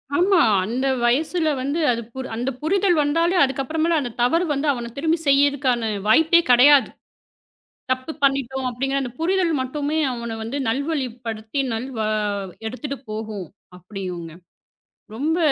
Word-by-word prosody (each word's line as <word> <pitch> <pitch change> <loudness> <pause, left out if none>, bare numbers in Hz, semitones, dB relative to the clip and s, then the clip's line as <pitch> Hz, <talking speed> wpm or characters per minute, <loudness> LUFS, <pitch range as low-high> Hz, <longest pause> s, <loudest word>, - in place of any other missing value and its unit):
ஆமா. 360 +2 +4 0.2
அந்த 245 +6 -2 0.2
வயசுல 310 +6 +1
வந்து, 285 +5 -2
அது 235 -1 -2 0.3
அந்தப் 250 +2 -3
புரிதல் 370 +3 +2
வந்தாலே 330 +5 +1
அதுக்கு 270 0 0
அப்பறமேல 320 +4 0
அந்தத் 245 -4 -6
தவறு 330 +8 +2
வந்து, 285 +2 -2
அவனைத் 235 -1 -7
திரும்பிச் 325 +2 0
செய்யறதுக்கான 275 -4 +2 0.2
வாய்ப்பே 320 +9 +5
கெடையாது. 260 0 +6 1.0
தப்பு 255 +4 -1
பண்ணிட்டோம் 265 -1 +1
அப்படிங்கற 270 +3 -1
அந்தப் 250 -1 -7
புரிதல் 355 0 +1
மட்டுமே, 290 +4 -2
அவனை 235 -1 -5
வந்து 230 +5 -4
நல்வழிப்படுத்தி 245 -4 -3
நல்வா 225 -1 -3 0.6
எடுத்துட்டு 270 +4 -5
போகும், 215 -3 -5 0.3
அப்படியுங்க. 180 -3 -7 0.8
ரொம்ப 310 +8 0
270 Hz, 125 wpm, -22 LUFS, 235-315 Hz, 1.0 s, கெடையாது